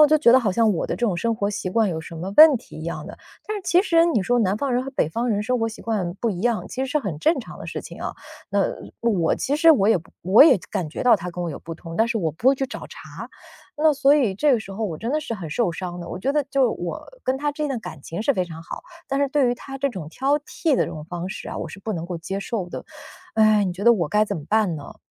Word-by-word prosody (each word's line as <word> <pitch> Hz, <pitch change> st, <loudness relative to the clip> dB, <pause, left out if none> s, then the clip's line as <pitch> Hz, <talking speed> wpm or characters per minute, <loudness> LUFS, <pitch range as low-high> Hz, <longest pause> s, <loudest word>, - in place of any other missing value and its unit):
我 300 Hz, -, +9 dB
就 310 Hz, -, +4 dB
觉 245 Hz, -6 st, +6 dB
得 260 Hz, -, +7 dB
好 220 Hz, -5 st, 0 dB
像 220 Hz, +3 st, +3 dB
我 -, -, -2 dB
的 -, -, -2 dB
这 240 Hz, -, 0 dB
种 185 Hz, -6 st, 0 dB
生 230 Hz, +6 st, 0 dB
活 200 Hz, -1 st, 0 dB
习 190 Hz, -2 st, -3 dB
惯 220 Hz, +1 st, +2 dB
有 160 Hz, -3 st, -3 dB
什 165 Hz, +1 st, -9 dB
么 185 Hz, +5 st, -5 dB
问 310 Hz, -3 st, +9 dB
题 -, -, -13 dB
一 -, -, -7 dB
样 170 Hz, -, -5 dB
的。 -, -, -9 dB, 0.3 s
但 430 Hz, -, -3 dB
是 405 Hz, -, -6 dB
其 360 Hz, 0 st, +4 dB
实， 335 Hz, -4 st, +4 dB
你 315 Hz, -11 st, +2 dB
说 245 Hz, +3 st, +2 dB
南 200 Hz, -2 st, +1 dB
方 270 Hz, +3 st, -1 dB
人 250 Hz, -, +1 dB
和 270 Hz, -, -6 dB
北 260 Hz, -, 0 dB
方 235 Hz, +9 st, -2 dB
人 205 Hz, -2 st, +1 dB
生 250 Hz, +2 st, +1 dB
活 225 Hz, -, +1 dB
习 225 Hz, -, -10 dB
惯 200 Hz, -6 st, -2 dB
不 230 Hz, +4 st, -2 dB
一 180 Hz, -, -4 dB
样， 235 Hz, 0 st, 0 dB
其 260 Hz, -, -3 dB
实 265 Hz, -, -6 dB
是 300 Hz, -, +2 dB
很 195 Hz, -, -4 dB
正 320 Hz, -, +3 dB
常 -, -, -8 dB
的 -, -, -7 dB
事 -, -, -4 dB
情 -, -, -10 dB
啊， -, -, -3 dB, 0.4 s
那 -, -, +1 dB, 0.4 s
我 195 Hz, -9 st, +1 dB
其 275 Hz, -, -1 dB
实 325 Hz, +2 st, +6 dB
我 215 Hz, -10 st, +4 dB
也 225 Hz, -, +5 dB, 0.3 s
我 190 Hz, +9 st, +7 dB
也 310 Hz, -, +7 dB
感 160 Hz, -4 st, -2 dB
觉 -, -, -5 dB
到 245 Hz, -2 st, +7 dB
他 180 Hz, -3 st, -3 dB
跟 175 Hz, 0 st, -4 dB
我 -, -, -2 dB
有 -, -, -7 dB
不 165 Hz, -, -8 dB
同， 165 Hz, -1 st, -9 dB
但 225 Hz, +4 st, +2 dB
是 235 Hz, -2 st, 0 dB
我 165 Hz, -6 st, -1 dB
不 225 Hz, -, +2 dB
会 270 Hz, -, +4 dB
去 270 Hz, -, -1 dB
找 -, -, -7 dB
茬。 -, -, -10 dB, 0.5 s
那 310 Hz, 0 st, +5 dB
所 280 Hz, 0 st, +4 dB
以 250 Hz, -10 st, +2 dB
这 290 Hz, +10 st, +2 dB
个 245 Hz, -, +3 dB
时 200 Hz, -2 st, -8 dB
候 210 Hz, +3 st, -5 dB
我 165 Hz, -5 st, -5 dB
真 230 Hz, -, -3 dB
的 305 Hz, -, +1 dB
是 285 Hz, -6 st, -4 dB
很 175 Hz, -7 st, -7 dB
受 220 Hz, +4 st, +1 dB
伤 175 Hz, 0 st, -6 dB
的， 170 Hz, -, -8 dB
我 -, -, -5 dB
觉 265 Hz, +9 st, 0 dB
得 295 Hz, 0 st, +2 dB
就 275 Hz, -, +2 dB
是 -, -, +6 dB
我 175 Hz, -6 st, -5 dB, 0.2 s
跟 260 Hz, -, 0 dB
他 290 Hz, +1 st, -1 dB
之 300 Hz, -, -5 dB
间 300 Hz, -, 0 dB
的 270 Hz, -3 st, -2 dB
感 160 Hz, -9 st, -9 dB
情 165 Hz, +7 st, -5 dB
是 280 Hz, -, +3 dB
非 185 Hz, -, 0 dB
常 165 Hz, -2 st, -8 dB
好， -, -, -8 dB, 0.2 s
但 275 Hz, +1 st, -1 dB
是 280 Hz, -, +2 dB
对 275 Hz, -2 st, +2 dB
于 -, -, 0 dB
他 270 Hz, +2 st, -9 dB
这 275 Hz, +1 st, 0 dB
种 185 Hz, -10 st, -7 dB
挑 275 Hz, -, +1 dB
剔 300 Hz, +1 st, -1 dB
的 -, -, +2 dB
这 -, -, -6 dB
种 155 Hz, -1 st, -7 dB
方 175 Hz, +2 st, -5 dB
式 -, -, -7 dB
啊， -, -, -5 dB
我 -, -, -4 dB
是 -, -, -10 dB
不 215 Hz, +3 st, -4 dB
能 170 Hz, -3 st, -4 dB
够 175 Hz, -, -4 dB
接 190 Hz, +4 st, -4 dB
受 195 Hz, -4 st, -4 dB
的。 -, -, -6 dB, 0.5 s
唉， 215 Hz, -1 st, +4 dB
你 185 Hz, -, -1 dB
觉 195 Hz, +4 st, -6 dB
得 235 Hz, -, +8 dB
我 175 Hz, -9 st, 0 dB
该 210 Hz, +4 st, +3 dB
怎 -, -, -4 dB
么 155 Hz, -, -5 dB
办 210 Hz, -5 st, +2 dB
呢？ 145 Hz, -, -10 dB
220 Hz, 340 characters per minute, -23 LUFS, 180-270 Hz, 0.5 s, 我